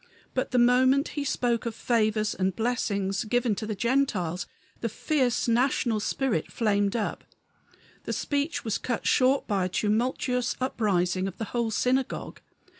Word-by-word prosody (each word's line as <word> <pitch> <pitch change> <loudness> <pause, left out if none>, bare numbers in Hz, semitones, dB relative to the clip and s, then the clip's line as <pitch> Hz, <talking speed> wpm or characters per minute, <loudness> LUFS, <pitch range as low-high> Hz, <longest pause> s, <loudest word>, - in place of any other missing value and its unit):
But 260 +1 -1
the 250 - 0
moment 260 +3 +4
he 290 - -3
spoke 240 -4 0
of 225 - -4
favors 215 -3 +1
and 190 -1 -1
blessings 200 -3 -1
given 245 +1 +1
to 215 +2 -4
the 215 - -2
Gentiles 205 -8 0 0.3
the 230 - -2
fierce 255 +1 0
national 235 -1 +2
spirit 220 - -1
flamed 205 -2 +1
up; 220 -3 -2 0.8
the - - -2
speech 285 0 -2
was 220 - -1
cut 240 -2 -3
short 260 +2 +3
by 195 -4 0
a - - -2
tumultuous 240 +4 0
uprising 190 -7 0
of 195 - -7
the - - -3
whole 235 -2 0
synagogue. 255 +4 -1
235 Hz, 150 wpm, -27 LUFS, 205-255 Hz, 0.8 s, moment